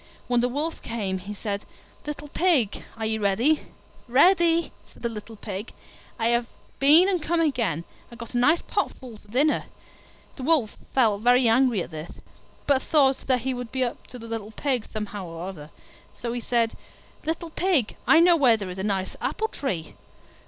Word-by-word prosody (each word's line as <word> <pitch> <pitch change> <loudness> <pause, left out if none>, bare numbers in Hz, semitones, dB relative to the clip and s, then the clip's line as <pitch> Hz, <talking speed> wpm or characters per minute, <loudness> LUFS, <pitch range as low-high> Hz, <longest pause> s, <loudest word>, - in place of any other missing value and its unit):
When 245 -1 +2
the 245 - +1
Wolf 300 +6 -2
came 200 -5 -3
he 200 +3 -7
said, 200 0 -4 0.4
"Little 295 0 -6
Pig, 290 - +2
are 220 - -3
you 220 0 -1
ready?" 230 +10 +2 0.4
"Ready!" 335 +5 +4 0.2
said - - -18
the 235 - 0
little 225 0 -8
Pig, 205 0 -6 0.4
"I 225 0 +1
have 235 0 +1 0.3
been 305 +7 +7
and 370 -4 +1
come 335 +2 0
back 325 -2 +4
again, 205 - -1 0.3
and 235 0 -13
got 235 0 -8
a - - 0
nice 305 +7 +3
pot - - -1
full 245 -5 -11
for - - -23
dinner." 275 +8 +1 0.7
The - - -7
Wolf 270 -6 +2 0.2
felt 220 -6 +3
very 245 +1 +5
angry 230 -4 +3
at - - -11
this, 155 +1 -7 0.5
but 275 -2 +3
thought 270 -3 +2
that 255 -2 +2
he 260 +2 -1
would 245 -2 -6
be 260 -1 0
up 240 - -4
to 250 - -9
the 230 - -10
little 225 -2 -5
Pig 250 +1 -2
somehow 210 -3 -5
or 165 +2 -6
other; 155 -6 -8 0.5
so 235 -1 -4
he 240 - -3
said, 230 -1 0 0.5
"Little 325 +1 -3
Pig, 330 - +1
I 325 - +7
know 345 0 +6
where 255 -8 +5
there 195 -3 -5
is 180 - -7
a - - -2
nice 195 -2 -2
apple 440 0 -1
tree." 180 - -4
240 Hz, 195 wpm, -25 LUFS, 210-290 Hz, 0.7 s, been